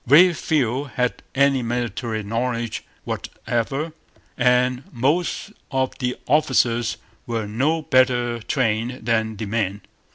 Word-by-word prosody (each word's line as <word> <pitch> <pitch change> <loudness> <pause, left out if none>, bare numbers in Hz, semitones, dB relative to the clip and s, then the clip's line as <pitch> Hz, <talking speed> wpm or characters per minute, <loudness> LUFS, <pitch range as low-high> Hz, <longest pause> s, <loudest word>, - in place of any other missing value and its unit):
Very 170 +7 +8
few 140 -4 0
had 125 -2 -1
any 140 -1 +4
military 115 -2 -2
knowledge 115 +1 -2 0.2
whatever; 135 +7 -3 0.4
and 125 +1 +3
most 150 - 0 0.2
of 130 -1 0
the 125 -2 -1
officers 120 -6 +2 0.3
were 115 -2 -1
no 140 +10 0
better 125 -4 +3
trained 115 0 -1
than 110 -1 +1
the 110 - -3
men. 100 -2 -1
125 Hz, 110 wpm, -23 LUFS, 115-135 Hz, 0.4 s, Very